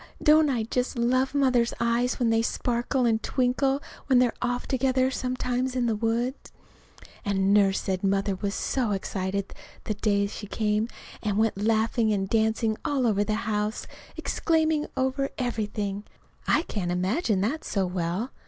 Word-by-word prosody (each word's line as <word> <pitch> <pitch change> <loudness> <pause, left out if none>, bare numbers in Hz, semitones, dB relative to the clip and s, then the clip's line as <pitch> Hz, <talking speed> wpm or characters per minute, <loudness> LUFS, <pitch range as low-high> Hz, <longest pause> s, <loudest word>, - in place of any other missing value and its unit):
Don't 305 0 +6
I 240 -5 0
just 250 +3 -2
love 255 +4 +1
Mother's 250 -4 +2
eyes 235 +1 +1
when 235 -2 +2
they 225 0 +3
sparkle 245 +2 0
and 225 -1 +2
twinkle 270 +2 +1 0.2
when 260 - +4
we're 245 -2 +3
off 245 0 -1
together 260 0 +1
sometimes 255 0 -2
in 250 -1 +1
the 225 -2 +1
woods?) 235 +4 -2 0.7
And 195 -1 +2
Nurse 195 -2 +4
said 190 -1 -2
Mother 195 0 +1
was 200 +1 -3
so 240 -6 0
excited 195 0 -3 0.3
the 215 - -2
day 200 -1 +1
she 205 +1 -7
came, 210 +1 0 0.3
and 205 -2 -1
went 220 0 +2
laughing 220 +1 +2
and 195 -2 0
dancing 220 0 +1
all 275 -3 0
over 205 -3 +2
the 215 +2 -2
house, 210 0 -1 0.3
exclaiming 315 -2 +1
over 265 +1 0
everything. 210 -5 -2 0.4
(I - - +3
can't 185 - -3
imagine 190 - 0
that 270 +11 -1
so 195 -2 0
well. 180 +6 -2
225 Hz, 155 wpm, -26 LUFS, 205-255 Hz, 0.7 s, Don't